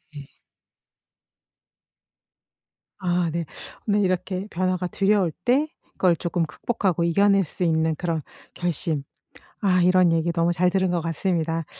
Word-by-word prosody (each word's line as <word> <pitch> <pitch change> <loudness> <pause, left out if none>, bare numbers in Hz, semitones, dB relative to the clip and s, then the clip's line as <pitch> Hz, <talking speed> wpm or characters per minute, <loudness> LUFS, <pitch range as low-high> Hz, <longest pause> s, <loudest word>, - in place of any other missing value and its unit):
예. 145 -1 -8 2.7
아 175 -1 0
네. 170 0 -2 0.4
오늘 205 0 +3
이렇게 185 +1 -1
변화가 185 -1 -1
두려울 195 -2 +2
때 275 +5 +3 0.3
그걸 180 -2 +3
조금 170 0 -1
극복하고 180 +1 -1
이겨낼 195 +3 +3
수 170 - -5
있는 160 -1 +2
그런 165 0 -2 0.3
결심. 165 -4 -2 0.6
아 185 -3 +3
이런 180 -1 +4
얘기 165 +1 +1
너무 170 0 +1
잘 180 +1 +2
들은 190 0 +1
것 175 -1 0
같습니다. 165 -1 -1
175 Hz, 245 characters per minute, -24 LUFS, 165-185 Hz, 2.7 s, 이런